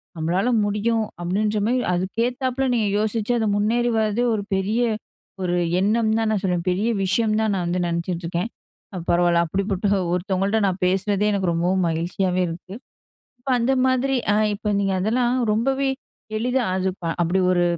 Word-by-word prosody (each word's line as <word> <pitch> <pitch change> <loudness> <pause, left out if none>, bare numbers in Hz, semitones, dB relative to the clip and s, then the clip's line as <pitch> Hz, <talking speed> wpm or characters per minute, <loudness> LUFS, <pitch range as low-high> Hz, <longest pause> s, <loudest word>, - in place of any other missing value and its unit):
நம்மளால 175 +7 0 0.2
முடியும் 220 +2 0 0.2
அப்டின்ற 210 +5 0
மாரி 250 +2 +1
அதுக்கேத்தாப்ல 245 +8 -1
நீங்க 220 -3 +1
யோசிச்சு 220 +1 -1
அது 220 - 0
முன்னேறி 235 +4 +1
வரதே 220 +2 +1
ஒரு 205 -2 -1
பெரிய 205 +5 0 0.6
ஒரு 180 -1 0 0.2
எண்ணம் 220 +3 +2
தான் 225 -1 +1
நான் 205 - 0
சொல்லுவேன். 180 -1 -1
"பெரிய 200 +6 0
விஷயம் 215 +3 +1
தான் 220 -1 +1
நான் 180 -2 -1
வந்து 175 +1 -1
நினைச்சிட்டுருக்கேன்." 170 +3 -2 0.6
பரவாயில்ல 170 0 +3
அப்டிப்பட்ட 195 +3 -1 0.3
ஒருத்தவங்கள்ட்ட 195 +3 0
நான் 185 0 -2
பேசுறதே 195 +2 +1
எனக்கு 190 -4 0
ரொம்பவும் 180 +2 +1
மகிழ்ச்சியாவே 180 +3 -1
இருக்கு. 175 +3 -8 0.7
இப்ப 265 - -7
அந்த 255 +3 +2
மாரி 260 +1 +1 0.2
ஆ - - +2 0.2
இப்ப 210 0 -2
நீங்க 195 -1 0
அதெல்லாம் 240 +4 +1 0.2
ரொம்பவே 270 +5 +1 0.5
எளிதா 250 +3 0
அது 190 0 0 0.3
அப்டி 175 +3 +1
ஒரு. 175 -1 +2
200 Hz, 150 wpm, -22 LUFS, 180-230 Hz, 0.7 s, பரவாயில்ல